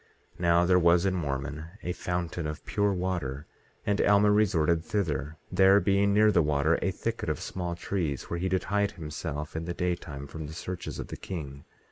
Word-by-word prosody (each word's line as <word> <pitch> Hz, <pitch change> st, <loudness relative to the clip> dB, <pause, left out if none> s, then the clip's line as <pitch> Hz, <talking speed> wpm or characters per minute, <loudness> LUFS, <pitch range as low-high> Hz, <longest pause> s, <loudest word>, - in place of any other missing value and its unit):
18:5 -, -, -26 dB
Now, 85 Hz, 0 st, +4 dB
there 90 Hz, 0 st, +5 dB
was 85 Hz, +1 st, +4 dB
in 95 Hz, -, +2 dB
Mormon 75 Hz, -2 st, -3 dB, 0.2 s
a 90 Hz, -, -2 dB
fountain 90 Hz, -2 st, -3 dB
of 75 Hz, 0 st, -6 dB
pure 100 Hz, +4 st, +1 dB
water, 90 Hz, -7 st, -2 dB, 0.4 s
and 100 Hz, 0 st, +1 dB
Alma 105 Hz, 0 st, +5 dB
resorted 85 Hz, -6 st, +3 dB
thither, 80 Hz, -6 st, -2 dB
there 95 Hz, +2 st, +6 dB
being 100 Hz, 0 st, +3 dB
near 105 Hz, +1 st, +5 dB
the 85 Hz, -, +4 dB
water 75 Hz, +1 st, +2 dB
a -, -, +1 dB
thicket 110 Hz, 0 st, -3 dB
of 75 Hz, -, -1 dB
small 90 Hz, -2 st, -4 dB
trees, 85 Hz, -5 st, -2 dB
where 85 Hz, -, -4 dB
he 95 Hz, +2 st, -1 dB
did 95 Hz, 0 st, +1 dB
hide 100 Hz, 0 st, 0 dB
himself 75 Hz, -2 st, -5 dB
in 80 Hz, 0 st, -3 dB
the 85 Hz, 0 st, -4 dB
daytime 85 Hz, -6 st, -3 dB
from 80 Hz, +1 st, -7 dB
the 80 Hz, -, -8 dB
searches 90 Hz, +2 st, -5 dB
of -, -, -6 dB
the -, -, -6 dB
king. 70 Hz, -6 st, -7 dB
85 Hz, 195 wpm, -28 LUFS, 75-95 Hz, 0.4 s, there